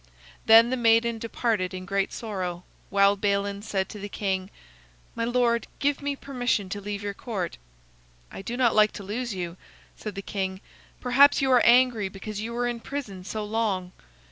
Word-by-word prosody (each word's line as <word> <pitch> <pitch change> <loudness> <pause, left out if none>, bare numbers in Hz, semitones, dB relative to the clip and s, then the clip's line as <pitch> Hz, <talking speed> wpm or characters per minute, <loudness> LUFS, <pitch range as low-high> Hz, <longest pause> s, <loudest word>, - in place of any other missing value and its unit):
Then 225 +2 +8
the 260 - 0
maiden 230 -1 +3
departed 220 -5 -1
in 185 0 -6
great 195 0 0
sorrow, 185 -5 -4 0.3
while 200 0 +4
Balin 200 0 -1
said 195 -3 -2
to 210 - -8
the 205 +1 -6
king: 190 -2 -2 0.6
"My 230 - -2
lord, 235 -1 +1
give 285 0 0
me 285 0 -2
permission 245 -8 -1
to 205 +1 -4
leave 205 0 -5
your 205 -1 -3
court." 195 - -4 0.7
"I - - -7
do 235 +5 -5
not 245 -3 +3
like 215 -1 +4
to 205 - -7
lose 220 +2 -3
you," 175 -1 -5 0.4
said 215 -3 -7
the 195 - -5
king. 190 -2 -3 0.4
"Perhaps 270 +3 +5
you 265 - +2
are 250 -2 +6
angry 240 -4 +4
because 205 +2 -6
you 225 +2 -4
were 240 +1 -1
in 240 -1 -3
prison 230 -9 -6
so 210 +3 -4
long. 205 -4 -1
215 Hz, 180 wpm, -26 LUFS, 195-235 Hz, 0.7 s, Then